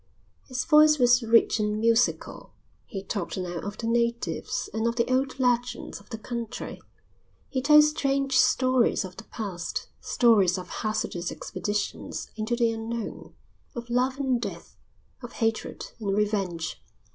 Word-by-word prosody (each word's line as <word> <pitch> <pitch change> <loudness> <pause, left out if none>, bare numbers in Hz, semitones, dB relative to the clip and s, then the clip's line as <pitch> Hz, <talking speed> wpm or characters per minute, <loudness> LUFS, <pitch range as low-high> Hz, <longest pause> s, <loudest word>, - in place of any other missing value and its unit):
His 255 -1 -3
voice 305 -1 +6
was 245 -1 +5
rich 230 -1 +4
and 210 0 0
musical. 230 +2 +1 0.3
He 195 -3 -6
talked 195 -3 -4
now 175 -2 -3
of 205 +3 -6
the 230 - -5
natives 235 0 -1
and 220 +1 0
of 235 - 0
the 235 -1 +1
old 265 0 0
legends 245 -1 0
of 200 - -20
the 225 - -5
country. 235 0 -6 0.7
He 260 - -1
told 300 +2 +7
strange 275 -3 +1
stories 255 -5 +3
of 185 -1 -10
the 225 - -9
past, 195 -7 -5
stories 205 -7 +3
of 180 -1 -7
hazardous 180 -5 -2
expeditions 205 0 -4
into 220 +2 -1
the 235 -1 +2
unknown, 225 0 -5 0.4
of 240 0 -6
love 255 +2 +1
and 260 -4 0
death, 205 -4 -7 0.5
of 240 -1 -9
hatred 225 -1 -2
and 200 -2 -1
revenge. 195 -6 -1
230 Hz, 145 wpm, -26 LUFS, 210-250 Hz, 0.7 s, told